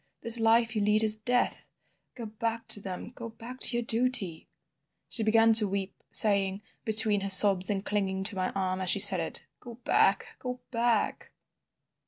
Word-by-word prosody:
This 230 0 +4
life 225 +1 0
you 215 - -3
lead 210 +1 0
is 215 -1 +3
Death. 245 +3 -4 0.5
Go 240 -3 -10
back 225 +1 -7
to - - +1
them, 190 0 -10
go 235 -1 -12
back 235 +3 -13
to 240 - -1
your 240 - -4
duty—' 230 -8 -4 0.6
"She 230 - +4
began 225 +1 +1
to 215 -1 +6
weep, 195 0 -8
saying, 200 -1 0 0.2
between 215 -2 0
her 195 - -6
sobs, 190 -1 +8
and 200 -1 -5
clinging 190 -2 -5
to 200 +1 -4
my 185 -1 -4
arm 185 -1 -5
as 185 - -5
she - - +1
said 195 -2 +7
it, 165 - -4
'Go 240 -1 -14
back—Go 250 +6 -3
back. 230 -2 -4
215 Hz, 175 wpm, -25 LUFS, 195-230 Hz, 0.6 s, sobs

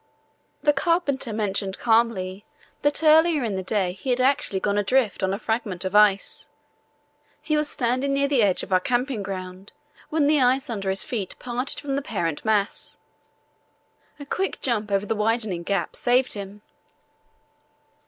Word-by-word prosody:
The 295 0 +4
carpenter 285 -5 0
mentioned 200 -2 -2
calmly 220 -4 +1 0.4
that 290 +2 +1
earlier 315 -1 +5
in 215 -4 -2
the 190 - -2
day 190 -1 -1
he 195 +8 -7
had 250 0 +1
actually 255 -7 +2
gone 200 +1 0
adrift 225 +2 +1
on 190 0 +1
a 195 - -1
fragment 210 -5 -3
of 185 - -3
ice. 210 -2 +3 0.9
He 305 +1 -1
was 300 0 0
standing 255 +3 0
near 280 0 +2
the 275 -4 +2
edge 195 -4 +2
of 190 - -4
our 185 - +5
camping 245 +3 -1
ground 190 0 -7 0.4
when 310 -2 +1
the 295 -1 +3
ice 255 0 +2
under 200 -3 -3
his 190 +1 +1
feet 225 -10 -4
parted 250 +2 -4
from 280 -2 -3
the 280 - -1
parent 175 - -3
mass. 210 -2 -1 1.2
A 285 - -8
quick 380 +7 -2
jump 215 -5 -1
over 200 +1 +1
the 220 - -1
widening 215 -4 0
gap 175 -1 -2
saved 255 +1 +2
him. 205 0 -8
225 Hz, 165 wpm, -24 LUFS, 195-270 Hz, 1.2 s, earlier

